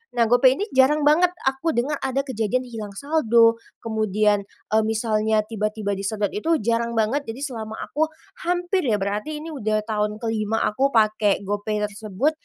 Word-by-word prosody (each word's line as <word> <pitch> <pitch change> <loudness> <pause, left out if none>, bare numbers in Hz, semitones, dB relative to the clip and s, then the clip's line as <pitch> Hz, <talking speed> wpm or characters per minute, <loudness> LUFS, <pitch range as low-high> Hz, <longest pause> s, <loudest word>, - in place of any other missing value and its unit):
nah 235 - +4
GoPay 255 +1 +6
ini 410 - 0
jarang 285 +3 +4
banget 335 +4 +5 0.2
aku 270 +5 0
dengar 275 +5 0
ada 270 +1 0
kejadian 255 -1 -1
hilang 220 -3 -7
saldo, 235 -4 +3 0.3
kemudian, 215 -2 +1 0.3
eee, 220 - +4
misalnya 220 -1 +1
tiba-tiba 215 -2 -2
disedot 205 +1 -2
itu 320 +9 +1
jarang 235 +1 0
banget. 225 +6 +1
Jadi 225 +3 -6
selama 220 -6 -5
aku 315 +2 0 0.4
hampir 355 +2 0
ya 210 -3 +2
berarti 210 +10 -3
ini 315 - -8
udah 215 -6 0
tahun 210 -1 -1
ke-5 225 -1 -1
aku 265 +6 +2
pakai 215 -2 +3
GoPay 205 +1 -2
tersebut, 210 +6 -1
225 Hz, 160 wpm, -23 LUFS, 215-265 Hz, 0.4 s, GoPay